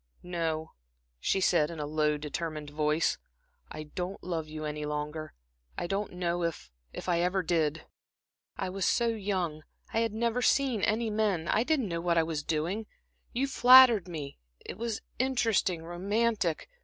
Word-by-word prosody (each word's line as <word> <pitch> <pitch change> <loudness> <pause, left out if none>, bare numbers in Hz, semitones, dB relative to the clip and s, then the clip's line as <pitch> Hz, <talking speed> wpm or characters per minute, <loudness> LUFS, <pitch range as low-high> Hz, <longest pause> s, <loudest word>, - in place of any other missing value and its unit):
"No," 165 -3 -2 0.5
she 195 - +1
said, 170 -5 +3
in 165 -2 -7
a 150 - -2
low, 150 0 +1
determined 150 0 -5
voice, 150 +2 +1 0.5
"I 155 - -6
don't 180 +5 -5
love 165 -3 -3
you 155 0 -6
any 150 0 -4
longer. 150 - -4 0.4
I - - -2
don't 195 +2 -2
know 175 -1 -1
if 165 - -3 0.4
I 175 -2 +2
ever 180 +2 +1
did. 160 -2 0 0.7
I - - -2
was 190 +1 -3
so 235 -1 +2
young, 190 -8 -2 0.3
I 225 - +2
had 230 -1 +1
never 235 +2 0
seen 255 -4 +2
any 220 +2 +1
men, 205 -6 0
I 215 - +3
didn't 270 -3 +1
know 170 -2 -3
what 170 -1 +1
I 165 - +5
was 160 -2 -2
doing. 170 +9 -2 0.4
You 255 +3 0
flattered 250 -6 +7
me; 150 - -6 0.3
it - - -7
was 230 -2 -3 0.2
interesting, 225 -9 +1
romantic. 195 0 0
175 Hz, 160 wpm, -30 LUFS, 155-215 Hz, 0.7 s, flattered